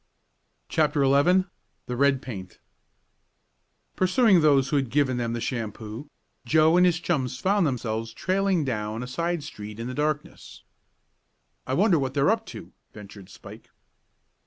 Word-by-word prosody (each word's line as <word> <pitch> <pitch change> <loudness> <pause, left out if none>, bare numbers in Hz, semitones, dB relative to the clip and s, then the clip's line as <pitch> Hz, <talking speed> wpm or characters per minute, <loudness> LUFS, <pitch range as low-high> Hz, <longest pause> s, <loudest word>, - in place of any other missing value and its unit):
CHAPTER 150 -2 +1
XI 145 +8 +4 0.4
THE 125 - -4
RED 135 0 +2
PAINT 95 -7 -8 1.4
Pursuing 185 0 +4
those 140 -3 +3
who 150 - -1
had 135 -3 -1
given 130 -1 +1
them 115 -1 -2
the 120 - -3
shampoo, 115 +2 -5 0.3
Joe 155 +5 +4
and 180 0 +5
his 175 -1 +1
chums 135 -8 -2
found 195 +2 +1
themselves 115 -3 -3
trailing 185 +2 0
down 110 -2 -3
a - - -7
side 170 +4 -2
street 105 -6 -9
in 115 - -4
the 125 - -5
darkness. 150 +1 -4 1.0
"I 130 - -1
wonder 185 -2 +3
what 135 0 -3
they're 140 0 +3
up - - -2
to," - - -10 0.2
ventured 100 -2 -12
Spike. - - -13
140 Hz, 145 wpm, -25 LUFS, 115-165 Hz, 1.4 s, and